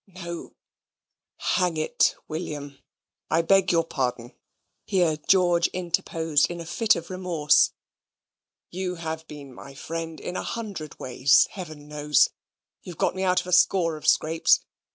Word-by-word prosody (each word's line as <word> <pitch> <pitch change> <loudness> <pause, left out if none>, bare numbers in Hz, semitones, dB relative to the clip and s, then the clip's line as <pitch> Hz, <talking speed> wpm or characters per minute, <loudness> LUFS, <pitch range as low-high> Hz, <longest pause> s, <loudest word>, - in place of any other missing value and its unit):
"No, 170 -3 -8 0.8
hang 180 -4 0
it, 155 - +1
William, 145 -3 -6 0.5
I 165 +1 +2
beg 195 +2 +3
your 165 -1 +3
pardon" 125 -6 -3 0.5
here 175 -6 +1
George 175 -3 +4
interposed 165 -3 0
in 175 0 -6
a 170 - -7
fit 215 +6 +2
of 170 +2 -7
remorse; 175 -5 +2 1.0
"you 180 0 -3
have 160 -1 -6
been 140 -3 -10
my 135 +2 -12
friend 165 +2 -6
in 180 - -6
a - - -2
hundred 200 -10 -6
ways, 130 +2 +4
Heaven 155 -6 -9
knows. 150 -1 +2 0.5
You've 175 -3 -10
got - - +1
me 190 - -4
out 185 -1 +2
of - - -13
a 180 - -4
score 175 -2 +4
of 155 - -7
scrapes. 160 +1 +3
165 Hz, 145 wpm, -25 LUFS, 150-180 Hz, 1.0 s, George